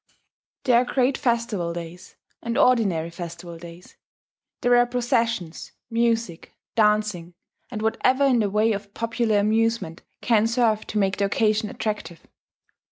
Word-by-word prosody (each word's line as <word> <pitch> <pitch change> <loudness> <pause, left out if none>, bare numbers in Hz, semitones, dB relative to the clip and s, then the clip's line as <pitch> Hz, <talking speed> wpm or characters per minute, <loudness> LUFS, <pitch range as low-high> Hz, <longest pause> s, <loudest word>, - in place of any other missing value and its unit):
There 245 -3 +4
are - - +1
great 255 +1 +1
festival 230 -9 -1
days 170 +1 -9 0.3
and 235 +1 -3
ordinary 205 - +2
festival 170 -1 -8
days; 170 +1 -13 0.6
there 245 0 +4
are 245 0 +4
processions, 235 - -2 0.2
music, 230 -6 -1 0.2
dancing, 210 -5 +1 0.3
and 220 -3 -5
whatever 255 +5 +2
in 255 -3 +3
the 210 -2 +1
way 215 +3 +2
of 200 -1 -5
popular 230 -1 0
amusement 220 -4 0 0.2
can 225 -2 +2
serve 230 -2 +1
to 215 - -4
make 195 -1 +1
the 200 - +1
occasion 215 +1 +1
attractive. 190 -8 -5
215 Hz, 135 wpm, -24 LUFS, 180-235 Hz, 0.6 s, There